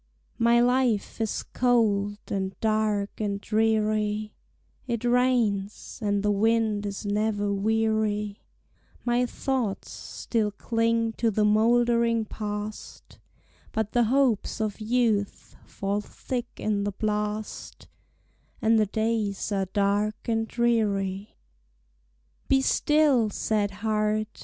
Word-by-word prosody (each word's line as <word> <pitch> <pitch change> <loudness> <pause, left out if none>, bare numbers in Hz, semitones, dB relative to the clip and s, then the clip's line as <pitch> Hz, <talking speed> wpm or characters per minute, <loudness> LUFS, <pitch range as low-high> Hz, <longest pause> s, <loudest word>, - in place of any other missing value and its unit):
My 235 +1 +4
life 245 -3 +1
is 220 - -1
cold, 210 -5 +2
and 190 -1 -3
dark, 215 -2 0
and 200 -1 -1
dreary; 215 -1 0 0.5
It 235 -2 -2
rains, 240 -5 0
and 205 -1 0
the 210 - +2
wind 215 0 +1
is 200 +1 -6
never 205 0 0
weary; 215 0 0 0.6
My 245 +1 +2
thoughts 245 -6 -2
still 220 -3 -2
cling 230 +2 0
to 230 - +2
the 215 0 +1
moldering 230 +1 +3
Past, 210 0 -7 0.5
But 220 -1 -1
the 240 -1 +3
hopes 250 -3 +1
of 215 -1 -2
youth 220 -3 0
fall 200 +1 -2
thick 245 +3 -5
in 205 -2 -1
the 205 0 -2
blast, 210 +1 -3 0.7
And 225 0 +3
the 215 - +2
days 220 -1 -1
are 195 -1 0
dark 205 +2 +1
and 225 -1 0
dreary. 205 -5 0 1.1
Be 270 - +4
still, 285 -5 +3
sad 210 0 0
heart! 215 +1 -1
215 Hz, 110 wpm, -26 LUFS, 205-230 Hz, 1.1 s, My